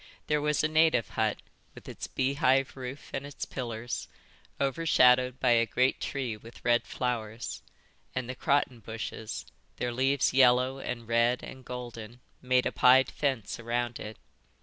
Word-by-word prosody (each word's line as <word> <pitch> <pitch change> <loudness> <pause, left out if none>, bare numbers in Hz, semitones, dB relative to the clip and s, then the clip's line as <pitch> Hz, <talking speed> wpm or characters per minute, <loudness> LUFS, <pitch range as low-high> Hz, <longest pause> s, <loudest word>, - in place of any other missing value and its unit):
There 150 -1 +1
was 150 0 +1
a - - +4
native 155 -6 +3
hut, 110 -2 -1 0.3
with - - -13
its - - -6
beehive 135 0 +1
roof 130 +1 -8
and 135 - -3
its 145 -1 -6
pillars, 120 -2 -5 0.5
overshadowed 130 -3 +3
by 125 - +3
a 115 -1 +4
great 130 +3 +1
tree 130 -5 -3
with 115 +2 -14
red 120 0 +3
flowers; 115 - -3 0.5
and 125 -1 -2
the 130 - -4
croton 130 -1 +1
bushes, 110 -1 -6 0.3
their 125 -1 -2
leaves 135 +2 +2
yellow 130 0 +4
and 120 -3 -5
red 115 +2 +2
and 130 -1 -9
golden, 120 -2 -8 0.2
made 125 0 +2
a - - 0
pied 130 +1 +5
fence 130 -9 -2
around 120 +1 -2
it. 105 0 -7
125 Hz, 150 wpm, -29 LUFS, 120-135 Hz, 0.5 s, pied